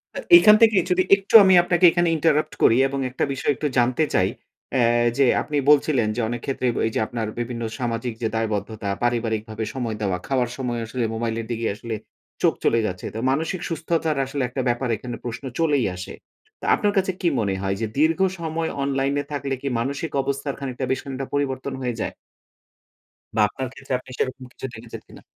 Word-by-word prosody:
আ - - -3 0.2
এখান 210 -10 +7
থেকে 220 -3 +6
যদি 180 +1 +3
একটু 195 +2 -10
আমি 190 -1 +5
আপনাকে 175 0 +3
এখানে 175 -1 +2
ইন্টারাপ্ট 155 -1 +1
করি 115 - +6
এবং 140 0 -4
একটা 125 - -2
বিষয় 135 - 0
একটু 150 - -2
জানতে 125 +5 +3
চাই। 95 +1 +3 0.4
অ্যাঁ 120 -2 +3
এ - - +2
যে 140 - +5 0.2
আপনি 150 -1 -3
বলছিলেন। 140 -6 +4
যে 120 - -1
অনেক 120 -1 -4
ক্ষেত্রে 130 -2 -1
ব - - -4
এইযে 115 - -2
আপনার 115 -3 -3
বিভিন্ন 120 -1 -4 0.2
সামাজিক 120 -1 -2
যে 110 - +1
দায়বদ্ধতা, 110 -1 -2
পারিবারিকভাবে 110 -2 -1
সময় 120 -4 -3
দেওয়া, 95 -3 0
খাওয়ার 125 -3 +1
সময়ও 120 -3 -2
আসলে 120 0 -2
মোবাইলের 115 0 -2
দিকে 115 0 -2
আসলে 115 0 -5 0.5
চোখ - - +4
চলেই 115 -1 +2
যাচ্ছে। 90 0 -6
তো - - -3
মানসিক 160 +5 -1
সুস্থতার 160 -2 -1
আসলে 135 +1 -4
একটা 130 +1 -3
ব্যাপার 120 +1 -1
এখানে 120 +1 -6
প্রশ্ন 120 +3 -5 0.2
চলেই 145 -6 +2
আসে। 90 - -7 0.5
তা - - -7
আপনার 205 -2 0
কাছে 190 0 +2
কি 175 - +1
মনে 100 -3 0
হয়? 95 0 -1
যে 110 - 0
দীর্ঘ 160 +3 +3 0.2
সময় 160 0 -2
অনলাইন 135 0 0
এ - - -7
থাকলে 140 -1 -2
কি 140 - -4
মানসিক 140 +6 -3
অবস্থার 140 0 -3
খানিকটা 130 -1 -4
বেশ 130 - 0
খানিকটা 135 -1 -5
পরিবর্তন 140 -1 -2
হয়ে 120 -2 -2
যায় - - -3 1.2
বা 110 - +3
আপনার 130 +4 -5
ক্ষেত্রে 135 -1 -6
আপনি 130 - -17
সেরকম 130 0 -2
কিছু - - -8
দেখেছেন 115 0 -9
কিনা? - - -14
130 Hz, 195 wpm, -23 LUFS, 115-145 Hz, 1.2 s, এখান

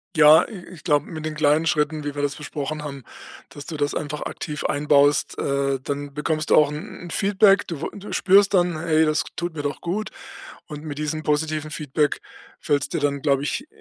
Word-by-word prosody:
Ja, 155 0 +8
i 195 -6 -9
ich 160 - -15
glaube, 145 0 +1
mit 155 -2 -7
den 155 - -3
kleinen 155 +1 +2
Schritten, 155 -1 0
wie 145 0 -4
wir 145 - -3
das 145 0 -1
besprochen 150 0 -5
haben, 140 -3 -7 0.5
dass 145 - -10
du 160 - -6
das 145 0 -1
einfach 150 0 -4
aktiv 150 -2 -5
einbaust, 145 +1 +2
äh, 140 -1 0
dann 145 0 -4
bekommst 155 +1 -2
du - - +7
auch 150 -1 +5
'n 150 +2 -7
'n 175 - -9
Feedback. 200 0 +4
Du 160 -5 -6
w - - -2
du 205 0 -9
spürst 200 +1 +4
dann: 175 -3 +2
„Hey, 160 -1 +2
das 155 0 +1
tut 175 -1 -4
mir 145 - -4
doch 145 -1 -3
gut.” 200 +5 -3 0.6
Und 150 0 -8
mit 145 -1 -6
diesem 155 +1 -3
positiven 155 0 -1
Feedback 150 0 -1 0.4
fällt 145 -1 0
es - - -4
dir - - -2
dann, 140 -1 -1
glaube 140 -2 +2
ich, 265 - -3
150 Hz, 215 wpm, -23 LUFS, 145-160 Hz, 0.6 s, Ja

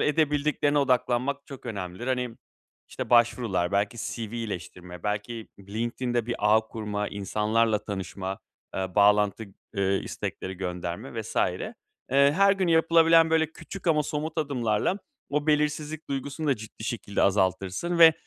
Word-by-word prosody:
edebildiklerine 150 -1 +2
odaklanmak 130 +1 +1
çok 135 -2 -10
önemlidir. 100 0 -5
Hani, 125 -2 0 0.6
işte, - - -6
başvurular, 115 -7 +3
belki 100 +2 +1
CV 110 0 -4
iyileştirme, 90 -5 -6
belki 105 +2 -3
LinkedIn'de 120 +4 -2
bir 120 - -1
ağ 105 +1 +5
kurma, 105 -2 -4
insanlarla 105 +2 0
tanışma, 95 -1 -4 0.4
eee, 95 -1 -3
bağlantı, 105 +1 +4 0.3
eee, 100 0 +2
istekleri 95 0 -5
gönderme 90 -2 -4
vs. - - -8
Eee, - - 0 0.4
her 145 +9 +5
gün 190 -3 0
yapılabilen, 165 0 +5
böyle, 160 -1 +2
küçük 195 +2 -9
ama 155 -2 +4
somut 155 +2 -3
adımlarla, 135 - 0 0.3
o 150 +1 0
belirsizlik 150 +1 0
duygusunu 140 +3 -3
da 140 -4 +3
ciddi 110 0 -10
şekilde 105 -3 -2
azaltırsın 95 - +1
ve 165 -1 +10
120 Hz, 130 wpm, -27 LUFS, 100-150 Hz, 0.6 s, ve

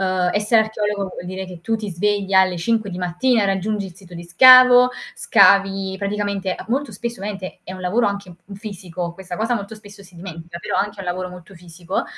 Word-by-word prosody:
Uhm, 185 -1 0
essere 215 +2 +3
archeologo 210 -2 -3
vuol 180 - -8
dire 190 +1 -5
che 180 -2 -11
tu 225 +6 -2
ti 215 -2 -4
svegli 195 +2 -1
alle 190 -1 +4
5 220 +4 -1
di 180 -1 -6
mattina 205 +7 +1
e - - +1
raggiungi 195 +1 -1
il 180 - -12
sito 180 -2 -15
di 170 - -8
scavo, 250 +7 +7 0.3
scavi 195 -1 +3
praticamente 200 -2 -2
a - - -9
molto 260 0 -2
spesso 235 +4 -6
ovviamente 195 -1 -6
è - - -8
un 185 - -9
lavoro 205 +6 +1
anche 200 -2 -4
m 200 - -11
fisico, 180 -4 -6
questa 180 0 -8
cosa 230 +5 -1
molto 200 +1 -7
spesso 205 -1 -15
si 185 -1 -19
dimentica, 170 -1 -9
però - - -3
è - - +2
anche 205 -1 -10
un - - -7
lavoro 180 +1 -3
molto 180 +1 -13
fisico, 175 +1 -5
195 Hz, 215 wpm, -20 LUFS, 180-210 Hz, 0.3 s, scavo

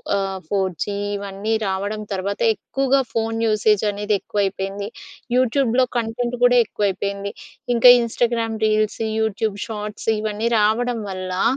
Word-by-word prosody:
ఆహ్, 195 -1 -1
4జీ 190 +1 -1 0.2
ఇవన్నీ 200 +1 -4
రావడం 200 +2 -2
తర్వాత 200 +1 -2
ఎక్కువుగా 270 +4 0
ఫోన్ 225 0 -1
యూసేజనేది 210 -1 +1
ఎక్కువైపేంది. 200 0 -2 0.5
యూట్యూబ్‌లో 255 0 +3
కంటెంట్ 240 +1 -1
గూడా 245 0 +6
ఎక్కువైపేంది. 200 -1 -2 0.4
ఇంకా 240 +1 +7
ఇన్స్టాగ్రామ్ 230 -1 0
రీల్స్, 215 0 +1 0.2
యూట్యూబ్ 220 -1 -1
షార్ట్స్ 210 -2 -6
ఇవన్నీ 215 +1 -2
రావడం 225 +3 +1
వల్లా, 185 -1 -3
215 Hz, 110 wpm, -21 LUFS, 200-230 Hz, 0.5 s, ఇంకా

